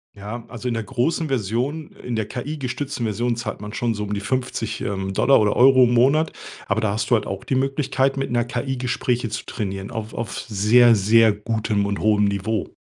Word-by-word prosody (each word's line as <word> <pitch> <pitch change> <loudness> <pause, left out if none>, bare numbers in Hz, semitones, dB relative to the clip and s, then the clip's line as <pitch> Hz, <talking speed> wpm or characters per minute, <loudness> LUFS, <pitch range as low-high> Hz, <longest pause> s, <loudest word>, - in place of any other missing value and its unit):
Ja, 105 +4 -7
also 120 +1 -6
in 120 - 0
der 115 - -2
großen 135 +7 -1
Version, 130 +5 -2
in 120 - -3
der 110 -1 -1
KI-gestützten 135 -1 -4
Version 115 +3 -1
zahlt 110 -3 -5
man 105 +2 -7
schon 120 -1 0
so 105 -1 -4
um 105 - -4
die 100 - -2
50, 115 -1 -2
ähm, 95 -1 -3
Dollar 135 +7 +4
oder 105 -1 +2
Euro 130 +1 +6
im 120 - +3
Monat, 140 +7 +3 0.4
aber 105 +2 0
da 105 -2 0
hast 110 +3 -3
du - - +7
halt 110 - -1
auch 95 0 -5
die - - -3
Möglichkeit, 135 0 0
mit 135 -2 -2
'ner 120 0 +2
KI 125 +2 -3
Gespräche 125 -1 -1
zu 110 - -5
trainieren 95 -3 -5
auf 110 0 -5
auf 115 -5 -4
sehr, 115 +3 +4
sehr 110 +3 +5
gutem 105 -1 -1
und 100 0 -2
hohem 105 -1 +3
Niveau. 100 +1 -2
115 Hz, 210 wpm, -22 LUFS, 105-130 Hz, 0.4 s, du